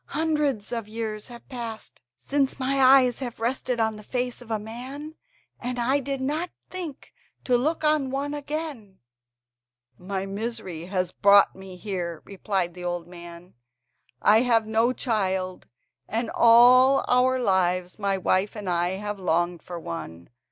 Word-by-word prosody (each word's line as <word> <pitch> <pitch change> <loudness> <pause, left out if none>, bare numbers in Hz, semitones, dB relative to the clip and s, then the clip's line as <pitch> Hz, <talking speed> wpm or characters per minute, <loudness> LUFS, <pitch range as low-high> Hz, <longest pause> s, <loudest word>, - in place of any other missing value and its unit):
Hundreds 300 -8 0
of 230 -3 -3
years 215 -1 -5
have 240 -2 -12
passed 235 -4 -7 0.2
since 275 -1 0
my 270 +1 +1
eyes 260 -2 +6
have 245 -4 -6
rested 245 +1 -1
on 220 -1 0
the 210 - -11
face 250 +2 -3
of 240 - -13
a 220 - 0
man, 255 +8 -8 0.5
and 245 +1 -4
I 255 +4 +2
did 275 0 -3
not 305 +7 -2 0.2
think 345 -7 -6 0.3
to 250 - +2
look 310 +6 0
on 300 -3 +2
one 280 +2 -2
again.". 290 -9 -5 1.0
"My 190 +1 -4
misery 195 -5 -5
has 185 -1 -1
brought 200 +1 +5
me 190 -1 -10
here," 180 -4 -5
replied 190 -3 -2
the 180 0 -9
old 175 -1 -3
man; 175 0 -12 0.7
"I 215 +2 +5
have 230 -3 +3
no 225 +3 +2
child, 190 -7 -2 0.4
and 225 +1 -2
all 250 +3 +6
our 255 +1 +3
lives 185 -4 +1
my 200 -1 0
wife 190 +3 +1
and 210 -3 -6
I 175 0 +1
have 205 +1 -5
longed 175 -1 0
for 175 -1 -7
one. 85 - -7
225 Hz, 150 wpm, -25 LUFS, 190-260 Hz, 1.0 s, eyes